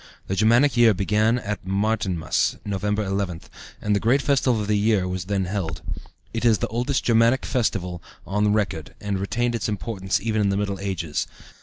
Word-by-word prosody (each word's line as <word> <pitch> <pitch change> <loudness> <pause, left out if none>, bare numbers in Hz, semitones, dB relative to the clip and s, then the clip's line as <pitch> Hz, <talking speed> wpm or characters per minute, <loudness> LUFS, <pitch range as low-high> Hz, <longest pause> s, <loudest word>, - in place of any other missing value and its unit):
The 95 - -2
Germanic 120 +7 +4
year 115 -3 +6
began 105 +4 +2
at 105 -4 -4
Martinmas 95 -2 0
(November 105 +1 -1
11th), 95 -4 -2 0.4
and 105 -1 0
the - - +2
great 130 +6 +2
festival 130 -4 +2
of 105 - -2
the 105 +1 +1
year 105 -2 +2
was 90 -1 -3
then 100 -1 0
held. 90 -4 -3 0.5
It 115 - -2
is 115 -3 +5
the - - -2
oldest 125 +5 -1
Germanic 115 +2 +3
festival 90 -8 -1 0.2
on 105 +2 +1
record, 95 -7 -1
and 100 -2 -2
retained 120 +5 -1
its 115 -2 -2
importance 100 -2 -2
even 110 -1 0
in 100 - +2
the 100 - 0
Middle 100 -1 -2
Ages. 85 -6 -2
105 Hz, 180 wpm, -24 LUFS, 95-115 Hz, 0.5 s, year